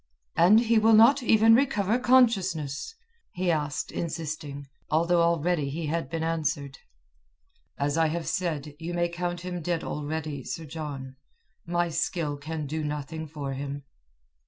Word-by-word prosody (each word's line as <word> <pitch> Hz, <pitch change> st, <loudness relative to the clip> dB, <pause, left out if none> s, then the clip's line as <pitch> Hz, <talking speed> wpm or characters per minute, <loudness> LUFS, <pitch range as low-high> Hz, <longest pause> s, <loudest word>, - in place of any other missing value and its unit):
"And 205 Hz, +7 st, +6 dB
he 230 Hz, -1 st, +3 dB
will 220 Hz, +1 st, +5 dB
not 235 Hz, +6 st, +7 dB
even 225 Hz, -1 st, +5 dB
recover 230 Hz, -3 st, +2 dB
consciousness?" 215 Hz, -, +2 dB, 0.4 s
he 180 Hz, -1 st, 0 dB
asked 150 Hz, -2 st, -2 dB
insisting, 150 Hz, -4 st, -5 dB, 0.2 s
although 170 Hz, +2 st, +3 dB
already 170 Hz, -3 st, +1 dB
he 160 Hz, +3 st, -4 dB
had 165 Hz, +2 st, -2 dB
been 165 Hz, -1 st, -3 dB
answered. 150 Hz, -4 st, -2 dB, 1.0 s
"As 145 Hz, +3 st, 0 dB
I 160 Hz, -, +4 dB
have 165 Hz, +1 st, -3 dB
said, 155 Hz, -3 st, -2 dB
you 170 Hz, +1 st, -4 dB
may 175 Hz, 0 st, +1 dB
count 175 Hz, 0 st, -3 dB
him 180 Hz, -1 st, -5 dB
dead 170 Hz, 0 st, -1 dB
already, 150 Hz, -2 st, -4 dB
Sir 165 Hz, -, -5 dB
John. 140 Hz, -4 st, -7 dB, 0.5 s
My 175 Hz, 0 st, 0 dB
skill 160 Hz, -2 st, -1 dB
can 155 Hz, +1 st, -5 dB
do 155 Hz, +2 st, -3 dB
nothing 150 Hz, +2 st, -4 dB
for 145 Hz, -2 st, -5 dB
him." 140 Hz, +1 st, -5 dB
165 Hz, 145 wpm, -27 LUFS, 150-180 Hz, 1.0 s, not